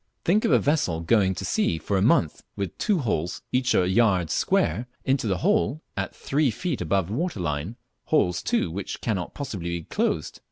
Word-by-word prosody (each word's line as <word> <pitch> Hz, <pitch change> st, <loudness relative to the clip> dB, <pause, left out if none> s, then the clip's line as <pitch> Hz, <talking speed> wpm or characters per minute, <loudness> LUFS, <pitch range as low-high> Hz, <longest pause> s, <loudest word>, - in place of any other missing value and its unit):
Think 210 Hz, +7 st, +3 dB
of -, -, +2 dB
a -, -, +7 dB
vessel 145 Hz, -, +1 dB
going 95 Hz, +1 st, +2 dB
to -, -, -5 dB
sea 80 Hz, -, +1 dB
for 100 Hz, +6 st, -2 dB
a 95 Hz, -, +2 dB
month 100 Hz, -, +2 dB
with 100 Hz, -4 st, -4 dB
two 205 Hz, -, +2 dB
holes, 90 Hz, -, -2 dB
each 125 Hz, 0 st, +2 dB
a 90 Hz, -, +3 dB
yard 95 Hz, -5 st, +2 dB
square, 110 Hz, +11 st, +1 dB, 0.2 s
into 130 Hz, -3 st, +1 dB
the 95 Hz, -3 st, +1 dB
hold, 205 Hz, -7 st, +2 dB, 0.2 s
at 100 Hz, -1 st, -3 dB
three 145 Hz, 0 st, +1 dB
feet 145 Hz, -, -3 dB
above 90 Hz, +1 st, 0 dB
the -, -, -4 dB
water 160 Hz, -, -2 dB
line, 80 Hz, +5 st, -2 dB, 0.3 s
holes, 90 Hz, -1 st, +2 dB
too, -, -, 0 dB
which 95 Hz, +3 st, -5 dB
cannot 95 Hz, -6 st, -2 dB
possibly 100 Hz, -, -4 dB
be 85 Hz, -1 st, -3 dB
closed! -, -, -2 dB
100 Hz, 195 wpm, -25 LUFS, 85-135 Hz, 0.3 s, a